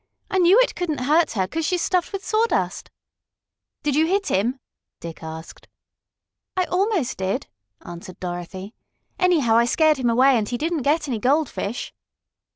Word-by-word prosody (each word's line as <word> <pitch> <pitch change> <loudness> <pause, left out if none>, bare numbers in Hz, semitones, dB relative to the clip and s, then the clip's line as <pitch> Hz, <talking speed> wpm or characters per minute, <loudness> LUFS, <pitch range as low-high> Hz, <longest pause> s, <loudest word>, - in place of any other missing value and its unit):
"I 380 - +2
knew 365 +6 +6
it - - +1
couldn't 320 -6 -3
hurt 310 +6 +2
her, 190 -4 0
'cause 325 +10 -3
she's 355 +2 0
stuffed 360 -2 0
with 395 -1 -5
sawdust." 445 +2 0 0.9
"Did 290 -2 0
you 315 +2 +3
hit 390 +2 0
him?" 235 +8 0 0.4
Dick 165 -1 -9
asked. 160 0 -9 0.9
"I 370 - +3
almost 365 - 0
did," 190 +1 -1 0.4
answered 175 +1 -10
Dorothy. 180 +3 -6 0.5
"Anyhow, 310 -12 +3
I 235 - +4
scared 310 +4 +3
him 250 -2 0
away, 260 +3 +5
and 210 - -3
he 245 - -2
didn't 320 +2 -1
get 300 +4 +1
any 240 -5 -2
goldfish." 255 -3 -1
280 Hz, 160 wpm, -23 LUFS, 210-345 Hz, 0.9 s, knew